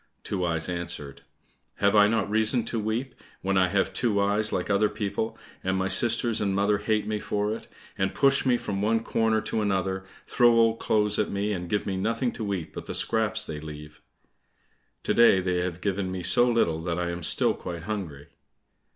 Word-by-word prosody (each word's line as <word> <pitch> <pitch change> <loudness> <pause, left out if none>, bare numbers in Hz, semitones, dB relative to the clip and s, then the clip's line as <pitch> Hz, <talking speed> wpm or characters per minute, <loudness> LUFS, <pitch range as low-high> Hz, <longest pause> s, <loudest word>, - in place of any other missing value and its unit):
Two 95 -3 -3
Eyes 80 -2 -1
answered, 85 -6 -4 0.5
"Have 100 +1 +2
I 105 0 +7
not 115 0 0
reason 110 +2 +1
to 115 - -2
weep, 115 +5 -2 0.3
when 95 +1 0
I 95 -1 +4
have 95 +1 0
two 105 -1 +1
eyes 105 +2 +2
like 90 - -2
other 105 +1 +2
people, 110 +2 -3 0.3
and 95 0 0
my 95 0 0
sisters 115 +4 +1
and 100 -2 0
mother 100 +1 +2
hate 110 -1 0
me 105 0 -2
for 105 +1 -1
it, 110 - -8 0.3
and 95 0 +1
push 140 0 +3
me 125 -2 +3
from 100 -4 -4
one 110 +2 +1
corner 110 -1 +1
to 110 - -2
another, 95 -2 -1 0.2
throw 120 -1 +4
old 115 -1 +3
clothes 105 -1 +1
at - - +1
me, 100 +1 -1
and 90 -2 -5
give 105 - -1
me 95 -1 -2
nothing 115 +5 -1
to 105 -4 -4
eat 90 -5 -4
but - - -8
the - - -4
scraps - - +1
they 75 -1 -6
leave? 75 0 -10 1.0
To - - 0
day 115 -5 +6
they 90 -1 -1
have 90 0 -3
given 95 -1 -2
me 95 -1 -5
so 95 +8 +4
little 85 -9 +1
that 85 +1 -3
I 90 -1 -1
am 85 0 -5
still - - +3
quite 85 -2 -7
hungry." 85 -9 -5
100 Hz, 205 wpm, -26 LUFS, 90-110 Hz, 1.0 s, I